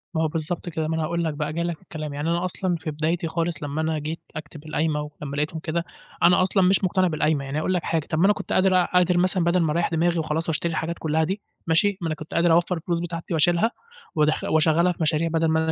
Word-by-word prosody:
ما 160 - +1
هو - - +2
بالضبط 165 +3 -3
كده. 160 -1 -2
ما 160 - -1
أنا 160 - -1
هاقول 170 +2 -1
لك 160 - -1
بقى، 150 0 -3
جاي 170 - -1
لك 170 -1 -2
في - - -32
الكلام، 155 -2 -6
يعني 145 +3 -2
أنا 170 +1 0
أصلًا 185 0 -1
في 160 -1 -4
بدايتي 165 +3 -1
خالص، 165 -1 -2
لمّا 145 +2 -2
أنا 160 -1 -1
جيت 155 +3 -4 0.2
أكتب 155 0 -8
القايمة، 150 -1 -1
ولمّا 145 -1 -5
لقيتهم 150 +2 -2
كده، 170 +1 -2 0.4
أنا 180 +1 +6
أصلًا 190 +1 +2
مش 190 +2 +4
مقتنع 185 0 +2
بالقايمة، 155 -3 0
يعني 135 +2 -4
هاقول 170 +4 0
لك 180 - 0
حاجة، 160 -2 -1
طَب 155 - 0
ما 180 - +5
أنا 205 - +5
كنت - - -5
قادر 185 0 +4
أ - - -1
قادر 180 0 +4
مثلًا 185 0 +2
بَدَل 170 +1 +2
ما 160 - +1
أريَّح 170 +2 +1
دماغي، 170 +1 +1
وخلاص، 160 +1 -1
واشتري 165 +2 0
الحاجات 165 +1 -2
كلها 160 0 +1
دي، 190 +5 -2 0.3
ماشي؟ 190 +4 +3
ما 170 - -1
أنا 155 - -1
كنت 155 +1 -10
قادر 170 0 +3
أوفَّر 170 +2 +3
الفلوس 170 +1 -2
بتاعتي 170 0 -5
وأشيلها، 175 +7 +3 0.4
وادخ 155 0 +2
واشغَّلها 160 +3 +3
في - - -8
مشاريع، 160 +1 +2
بَدَل 165 0 +1
ما 160 0 +2
أنا 160 - 0
165 Hz, 265 wpm, -24 LUFS, 155-175 Hz, 0.4 s, أنا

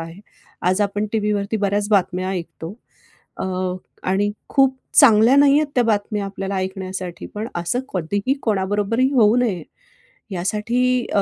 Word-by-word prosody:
आहे. 165 +3 -9 0.5
आज 185 +3 +1
आपण 205 +1 -1
टीव्हीवरती 210 -1 0
बऱ्याच 205 0 0
बातम्या 185 -2 +1
ऐकतो 170 -3 -6 0.7
अ, - - -3 0.7
आणि 200 +2 +1 0.2
खूप 270 -1 +3 0.2
चांगल्या 230 -2 +6
नाहीयेत 285 +2 +5
त्या 245 - +4
बातम्या 210 -1 0
आपल्याला 195 0 -4
ऐकण्यासाठी. 185 -1 -5
पण 215 +2 -3
असं 175 +7 -1
कधीही 200 +8 -1
कोणाबरोबरही 205 +4 +1
होऊ 225 -4 +5
नये, 205 -9 0 0.7
यासाठी 235 +7 0
अ, 200 - +4
205 Hz, 130 wpm, -21 LUFS, 190-230 Hz, 0.7 s, चांगल्या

